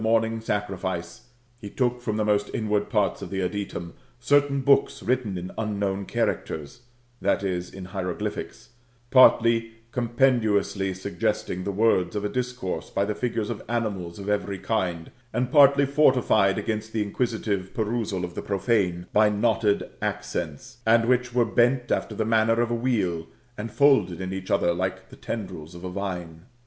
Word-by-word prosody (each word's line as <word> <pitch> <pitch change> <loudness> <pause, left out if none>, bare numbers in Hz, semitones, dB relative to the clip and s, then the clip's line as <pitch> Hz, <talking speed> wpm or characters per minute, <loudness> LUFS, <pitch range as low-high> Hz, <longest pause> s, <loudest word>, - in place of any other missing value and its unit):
tOj 110 +1 +4
mominfl: 115 0 -3
sacrifice, 95 -3 -3 0.4
Jie 100 -2 -9
took 125 -1 +1
from 110 -3 -2
the 110 - +1
most 105 -1 +1
inward 105 -2 0
parts 105 -4 +1
of - - -6
the 95 0 -2
adytum, 90 -3 -4 0.3
certain 140 +2 +3
books 140 +1 +3
written 120 -6 0
in 90 +1 -6
unknown 100 -2 -1
characters 75 +8 -2 0.4
[t\e, 95 -2 0
in 95 - -7
hieroglpyhics]; 90 -1 -5 0.4
partly 115 -3 +5 0.2
compendiously 115 -6 +1
suggesting 90 -1 -2
the 100 - -2
words 100 -3 +2
of 105 0 -2
a - - 0
discourse 125 -6 -3
by 100 - 0
the 105 - -1
figures 110 -1 -2
of - - -5
animals 100 -8 -2
of 100 0 -8
every 100 -1 -1
kind; 90 -6 -2 0.2
and 125 0 -1
partly 140 -1 +6
fortified 130 -8 +3
against 110 +1 -3
the 110 -2 +1
inquisitive 105 -3 -2
perusal 110 -4 -1
of 85 - -9
the - - -4
profane, 95 -4 0
by 105 0 +5
knotted 105 0 +1
accents, 105 -7 -4
and 115 +1 +4
which 125 0 +2
were 120 -1 +3
bent 120 +4 +2
after 110 - -1
the 110 - -1
manner 115 +1 +3
of 120 0 +1
a - - +1
wheel, 105 -9 0 0.3
and 110 +1 -5
folded 135 - +3
in 95 0 -4
each 95 -1 -6
other 85 -3 +2
like 95 +2 -3
the - - -12
tendrils 90 -7 -6
of 85 - -10
a 90 - -4
vine. 90 -4 -5
105 Hz, 160 wpm, -25 LUFS, 95-115 Hz, 0.4 s, partly